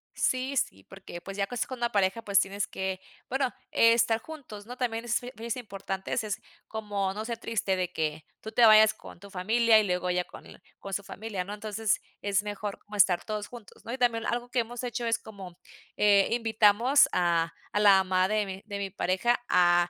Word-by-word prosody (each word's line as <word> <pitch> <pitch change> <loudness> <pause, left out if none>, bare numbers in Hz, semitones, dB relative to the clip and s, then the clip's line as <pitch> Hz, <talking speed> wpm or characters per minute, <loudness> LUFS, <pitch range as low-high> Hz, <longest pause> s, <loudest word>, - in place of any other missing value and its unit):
Sí, 260 +2 0
sí, 95 - -1
porque 190 -3 -10
pues 195 +2 -8
ya 200 - +1
cos 245 -2 -2
con 260 - -6
una 240 0 0
pareja 200 +2 +1
pues 200 -3 +3
tienes 200 +1 -1
que 190 -1 -3 0.3
bueno 265 -1 0 0.2
estar 230 -1 +4
juntos, 245 -8 -10
¿no? 245 +2 -8
También 235 -2 -2
es 235 0 +1
fi 245 0 -8
es 230 0 -3
importante 195 -4 -6
ese 225 -4 -1
es 205 - -3 0.3
como 205 -3 -2
no 215 +2 -4
ser 235 -1 -3
triste 225 -4 -1
de 180 -1 -2
que 155 -1 -2 0.2
tú 220 - -7
te 240 - +5
vayas 215 0 +7
con - - -13
tu 200 +2 -12
familia 220 +4 +4
y 215 - +2
luego 180 -1 -1
ya 180 0 +1
con - - -13
l - - -14 0.2
con 195 - -8
su 200 - -2
familia, 200 -2 -5
¿no? 200 +3 -7
Entonces 215 0 -1 0.2
es 200 -1 +1
mejor 205 -1 -5
como 210 0 -11
estar 185 -3 +4
todos 210 -1 -4
juntos, 235 -4 -13
¿no? 230 - -5
Y 260 - -3
también 230 -2 +1
algo 240 +1 -2
que 255 -1 0
hemos 240 +2 -3
hecho 240 -1 -3
es 230 -1 +1
como, 190 -5 -11 0.4
eh, 205 -1 +5
invitamos 230 +3 +4
a 170 -2 +1 0.2
a 205 - 0
la 205 -1 +7
mamá 185 0 +2
de 215 0 +1
mi 190 +1 -7
de 205 -2 -5
mi 200 -1 -3
pareja 190 +5 +1
a 175 -1 +4
210 Hz, 215 wpm, -28 LUFS, 190-230 Hz, 0.4 s, vayas